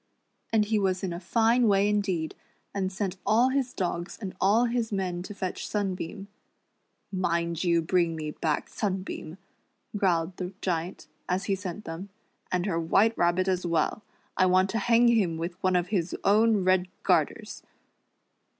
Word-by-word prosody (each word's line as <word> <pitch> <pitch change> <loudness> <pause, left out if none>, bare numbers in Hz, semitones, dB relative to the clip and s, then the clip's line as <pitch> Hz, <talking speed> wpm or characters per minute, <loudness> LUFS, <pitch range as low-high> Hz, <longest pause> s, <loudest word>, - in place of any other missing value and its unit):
And 220 -2 +3
he 215 0 +1
was 190 -2 0
in 180 -3 -2
a 170 - -5
fine 230 +5 +3
wa\' 200 - +4
indeed, 195 -6 0 0.4
and 190 -1 -1
sent 190 -1 -3
all 235 +4 +4
his 260 -2 0
dogs 175 -3 -3
and 195 -4 -5
all 215 +5 +4
his 235 -2 -1
men 185 -3 -2
to 200 +3 -8
fetch 185 -2 -4
Sunbeam. 195 -1 -3 0.8
"Mind 170 -3 -1
you 170 -2 +2
bring 170 -1 +1
me 155 -1 -4
back 150 -1 -1
Sunbeam," 190 -4 -4 0.6
growled 180 -3 +1
the 180 +1 -5
Giant, 175 0 -3 0.2
as 185 +2 0
he 200 - 0
sent 195 +1 -5
them, 165 +5 -6 0.4
"and 180 0 0
her 175 -5 0
White 200 +7 +3
Rabbit 175 +2 +2
as 185 -1 0
well. 170 +4 0 0.3
I 185 - +4
want 185 +1 +3
to 225 - 0
hang 235 +3 +4
him 195 -8 +2
with 170 +2 -3
one 185 -1 +2
of 180 0 +1
his 185 -5 -1
own 215 0 +4
red 185 0 +3 0.2
garters." - - 0
185 Hz, 165 wpm, -27 LUFS, 175-205 Hz, 0.8 s, wa